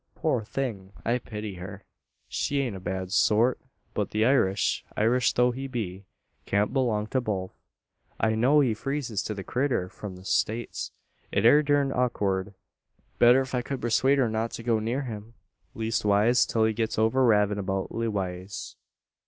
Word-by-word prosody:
Poor 110 - 0
thing! 105 -5 -4
I 120 +2 +1
pity 105 -3 -6
her. 95 +2 -8 0.4
She 140 - -1
ain't 120 -7 -3
a - - -6
bad 95 0 -4
sort. 115 +3 +3 0.3
But 105 - -1
the 110 +1 +1
Irish 105 -6 +2
Irish 120 +3 +3
tho' 125 0 +3
he 135 +2 -5
be 100 -7 -5 0.4
can't 100 +3 +1
belong 115 -6 +1
to 130 - +2
both; 95 -5 -3 0.7
an 110 - +2
I - - 0
know 130 +7 +4
he 125 -5 +2
freezes 125 -3 -3
to 110 - -4
the 95 - -6
critter 125 -8 -1
from 100 -1 -8
the 90 +1 -13
States. 115 +4 -1 0.4
It 100 - +1
air 145 +6 +7
durned 145 -2 +1
awkurd 100 -6 -1 0.6
Better 120 +2 +7
ef 130 0 -6
I 125 - +1
ked 135 +1 -4
pursuade 130 +4 +2
her 130 -3 +3
not 110 +1 -1
to 115 - -6
go 115 -2 +2
near 120 +6 -2
him 115 -2 -8 0.4
leastwise 110 0 +2
till 110 -1 +2
he 110 - +1
gets 110 0 -2
over 110 +4 +3
ravin' 105 -3 +3
about 95 -1 -2
Lewaze. 100 -4 -4
110 Hz, 170 wpm, -27 LUFS, 100-125 Hz, 0.7 s, air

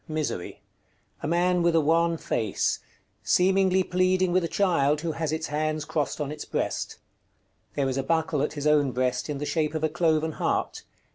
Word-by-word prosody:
_ - - -42
Misery. 155 - -4 0.6
A - - -3
man 175 +2 +2
with 170 -1 +2
a - - +6
wan 165 +2 +2
face, 110 -9 -1 0.4
seemingly 190 0 +3
pleading 185 0 +1
with 185 0 +2
a - - 0
child 155 -7 +2
who 165 -1 -2
has 160 -1 -2
its 160 0 -2
hands 155 0 -2
crossed 150 -1 -2
on 145 -1 -2
its 150 0 -6
breast. - - -3 0.8
There 140 -2 +1
is 130 0 -2
a - - -1
buckle 160 -1 0
at 150 - -1
his 145 -1 -5
own 145 -3 +3
breast 125 +2 -1
in 145 - -2
the 145 - -4
shape 155 0 -1
of 155 - -2
a 155 - +2
cloven 160 0 +1
heart. - - -2
155 Hz, 195 wpm, -26 LUFS, 150-170 Hz, 0.8 s, a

